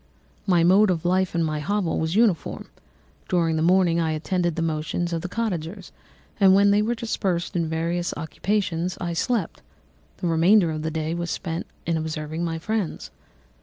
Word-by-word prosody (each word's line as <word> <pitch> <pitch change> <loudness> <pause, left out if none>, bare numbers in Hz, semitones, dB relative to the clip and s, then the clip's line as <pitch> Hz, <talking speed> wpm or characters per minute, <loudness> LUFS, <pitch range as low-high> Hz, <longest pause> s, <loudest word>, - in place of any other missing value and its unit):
"My 175 -3 +4
mode 195 +4 +5
of 175 -2 -1
life 185 0 +1
in 170 - +2
my 155 -1 -1
hovel 190 +3 -1
was 160 +2 -1
uniform. 215 -7 +1 0.6
During 165 -3 +2
the 155 - 0
morning 175 0 +3
I 160 -1 0
attended 175 +2 -1
the 165 - -1
motions 165 +2 -2
of 165 - -1
the 185 - -5
cottagers, 190 -4 -4 0.5
and 190 -2 +6
when 200 +1 +5
they 205 +1 +4
were 230 +3 0
dispersed 190 -7 -2
in 170 -2 0
various 170 +2 -1
occupations, 180 +2 -2
I 175 -2 -3
slept; 205 +2 -1 0.6
the - - -5
remainder 170 +2 +4
of 155 -1 -4
the 160 - -2
day 160 0 -2
was 170 0 -3
spent 165 0 -4 0.2
in 165 0 0
observing 155 +1 -4
my 165 -1 -2
friends. 210 +1 -3
170 Hz, 175 wpm, -24 LUFS, 160-190 Hz, 0.6 s, and